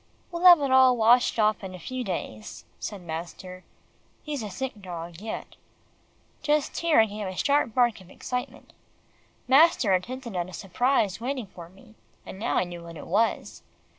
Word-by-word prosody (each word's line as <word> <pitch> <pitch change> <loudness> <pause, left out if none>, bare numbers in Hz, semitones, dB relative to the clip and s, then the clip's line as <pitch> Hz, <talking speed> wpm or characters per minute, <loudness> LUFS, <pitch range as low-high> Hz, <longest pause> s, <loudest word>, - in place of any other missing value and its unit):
"We'll 345 +1 -3
have 350 -2 +10
it 275 -2 0
all 260 -1 +6
washed 235 +2 +4
off 215 -1 +2
in 185 -1 -7
a - - -10
few 255 +8 -5
days," 140 - -6
said 205 -3 -6
master. 175 +3 -7 0.6
"He's 295 -4 -4
a 210 - -5
sick 220 +2 -6
dog 170 -1 -8
yet." 220 0 -7 0.9
Just 300 -1 0
here, 335 -6 +3
I - - +4
gave 210 -1 -6
a 185 - -6
sharp 280 -1 +1
bark 240 -5 +2
of 185 - -17
excitement. 250 +5 -6 0.7
Master 270 - +5
had 180 +1 0
hinted 255 -4 -7
at 175 0 -2
a - - -12
surprise 210 +3 0
waiting 255 -1 -3
for 175 -3 -12
me, 195 +4 -19 0.3
and 190 - -9
now 225 - -1
I - - +3
knew 175 -1 -8
what 170 -1 -10
it - - -9
was. 215 +6 -1
215 Hz, 180 wpm, -26 LUFS, 185-255 Hz, 0.9 s, have